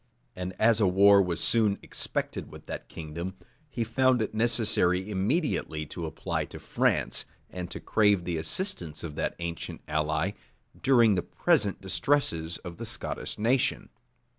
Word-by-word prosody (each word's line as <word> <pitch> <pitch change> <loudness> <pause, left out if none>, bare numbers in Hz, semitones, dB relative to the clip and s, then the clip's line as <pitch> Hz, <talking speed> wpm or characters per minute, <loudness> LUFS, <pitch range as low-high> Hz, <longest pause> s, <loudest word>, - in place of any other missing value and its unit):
And 90 -1 -6
as 115 0 +4
a 105 - +4
war 100 +2 +6
was 90 -3 -1
soon 110 -4 +3
expected - - -3
with - - -12
that - - -7
kingdom, 85 +4 -6 0.3
he 120 -3 -2
found 130 +2 +2
it 110 - -2
necessary 110 -5 +2
immediately 100 - -1
to 85 +2 -5
apply 80 - -3
to - - -10
France, - - +1 0.3
and 90 -1 -5
to - - -6
crave 105 -4 +2
the 85 -1 -2
assistance 80 - -2
of 80 -3 -5
that - - -2
ancient 85 -1 -5
ally, 80 +4 0 0.5
during 120 -5 +5
the 90 - +1
present 100 +2 +1
distresses 95 - 0
of 85 -1 -7
the - - -6
Scottish - - -2
nation. 120 +4 +1
95 Hz, 150 wpm, -28 LUFS, 85-115 Hz, 0.5 s, war